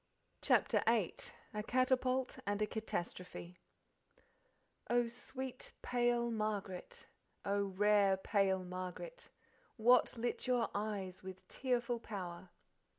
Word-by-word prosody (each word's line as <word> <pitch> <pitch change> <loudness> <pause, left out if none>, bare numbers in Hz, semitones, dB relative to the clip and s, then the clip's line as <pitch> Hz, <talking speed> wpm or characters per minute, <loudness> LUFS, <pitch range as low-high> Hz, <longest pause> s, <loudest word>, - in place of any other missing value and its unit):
CHAPTER - - +4
VIII - - +3 0.4
A 210 - -1
Catapult 255 +2 +2
and 205 0 +1
a 215 - +3
Catastrophe 180 -4 -4 1.3
"Oh, 240 0 +3
sweet 255 +2 -6
pale 240 -1 +2
Margaret, 210 -4 -3 0.4
Oh, 200 0 +2
rare 200 0 +4
pale 190 -1 +2
Margaret, 185 - -6 0.5
What 245 +2 +5
lit 240 +2 -2
your 245 -2 +2
eyes 200 -3 -3
with 190 0 -9
tearful 245 -2 0
power?" 185 -5 -6
215 Hz, 100 wpm, -37 LUFS, 190-245 Hz, 1.3 s, What